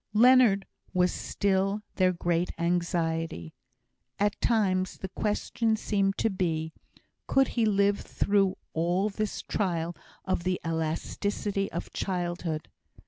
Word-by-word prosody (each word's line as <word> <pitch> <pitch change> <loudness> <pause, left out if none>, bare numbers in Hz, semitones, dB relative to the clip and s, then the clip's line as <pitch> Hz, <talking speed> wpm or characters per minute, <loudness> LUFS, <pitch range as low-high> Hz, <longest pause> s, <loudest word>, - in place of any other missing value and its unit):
Leonard 235 -3 +6 0.3
was 180 0 +3
still 195 +1 0
their 185 -1 +4
great 175 0 0
anxiety. 165 - -1 0.6
At 205 +1 0
times 190 -5 +1
the 190 - -6
question 220 +3 0
seemed 195 -2 0
to 225 - +1
be, 160 -4 -1 0.5
could 270 -1 +3
he 230 -2 +1
live 200 0 +3
through 195 -2 +1 0.2
all 175 +5 +1
this 215 +1 -3
trial 170 -4 -1 0.3
of 185 -2 -1
the 185 0 0
elasticity 195 +5 -2
of 170 - -5
childhood? 175 -4 -2
190 Hz, 115 wpm, -28 LUFS, 170-205 Hz, 0.6 s, Leonard